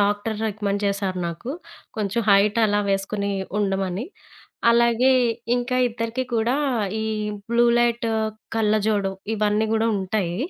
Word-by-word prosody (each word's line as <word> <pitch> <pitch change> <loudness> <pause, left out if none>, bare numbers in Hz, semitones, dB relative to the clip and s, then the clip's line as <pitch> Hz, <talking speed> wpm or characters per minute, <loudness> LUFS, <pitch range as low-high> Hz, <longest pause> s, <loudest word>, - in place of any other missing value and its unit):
Doctor 205 +2 0
recommend 205 -1 -2
చేశారు 195 -2 -1
నాకు. 170 +9 -5 0.5
కొంచెం 215 +1 -1
హైటలా 205 +1 +4
వేసుకొని 200 +1 -1 0.3
ఉండమని. 195 +1 -1 0.7
అలాగే 235 +2 +4 0.5
ఇంకా 245 +1 -1
ఇద్దరికి 230 +2 -3
కూడా 235 +4 +1 0.5
ఈ - - -2 0.5
బ్లూ 235 0 +4
లైట్ 235 -1 +1 0.5
కళ్ళజోడు 210 -2 +1 0.2
ఇవన్నీ 210 +1 +1
గూడా 225 +1 +2
ఉంటాయి. 185 -2 -2
210 Hz, 110 wpm, -23 LUFS, 200-230 Hz, 0.7 s, హైటలా